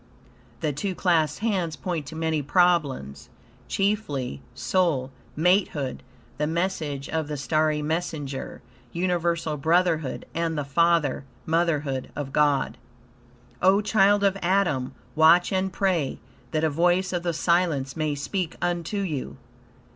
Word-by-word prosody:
The 155 -3 0
two 185 +7 -3
clasped 165 -2 +1
hands 185 -8 0
point 150 +1 -4
to 155 - -8
many 160 -1 0
problems, 145 - +1 0.4
chiefly 150 - -1
soul 135 0 0 0.3
matehood, 165 -6 +1 0.4
the 150 - +1
message 160 -5 -2
of 160 -2 -2
the 150 -1 -4
starry 155 +1 +1
messenger, 155 -4 -3 0.3
universal 170 -3 0
brotherhood, 160 -2 +1
and 165 -1 -1
the 145 - -2
Father 165 -1 +2 0.2
Motherhood 155 -5 0
of 140 -2 -5
God. 145 -2 +2 0.8
O 190 +2 +5
child 205 -1 +3
of 195 -1 +2
Adam! 175 -8 +1 0.2
Watch 165 +4 +5
and 190 0 0
pray, 175 -6 0 0.3
that 155 +4 -1
a 160 - +3
voice 175 +4 +2
of 175 - 0
the 175 0 -1
silence 165 -5 +1
may 155 -2 -1
speak 170 +4 -3
unto 175 +3 -1
you. 150 -9 -4
160 Hz, 125 wpm, -25 LUFS, 145-180 Hz, 0.8 s, O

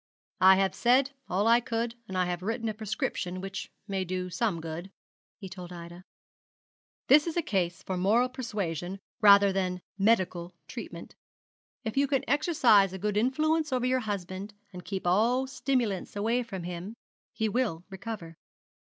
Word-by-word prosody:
'I 190 +1 +8
have 195 0 +1
said 260 +3 +3 0.2
all 195 +4 +1
I 235 +1 +6
could, 230 0 -2
and 190 - -4
I 180 - +2
have 175 0 -3
written 225 +4 -2
a 220 - -1
prescription 205 -4 -3
which 195 +1 -5 0.2
may 195 -2 -1
do 185 0 -3
some 195 -2 0
good,' 165 +3 -6 0.5
he 195 - -8
told 180 -1 -9
Ida. 175 +1 -10 1.0
'This 295 +4 +6
is 335 - -3
a 340 - +2
case 185 - -1
for 190 - -3
moral 215 +7 +3
suasion 195 - -3 0.2
rather 200 -1 +7
than 185 -1 -1 0.2
medical 185 -4 +1
treatment. - - -8 0.7
If 220 +3 -4
you 280 0 +4
can 270 -1 0
exercise 245 - +4
a - - -4
good 205 +2 -2
influence 305 +7 +1
over 250 -1 +1
your 255 0 +2
husband, 200 -2 -5 0.2
and 180 0 -8
keep 195 -3 -5
all 230 +9 +3
stimulants 255 -8 -1
away 225 +4 +1
from 195 -7 -6
him, 180 +5 -6 0.4
he 220 - -1
will 210 -7 -1
recover. 190 -4 -7
200 Hz, 160 wpm, -29 LUFS, 185-240 Hz, 1.0 s, I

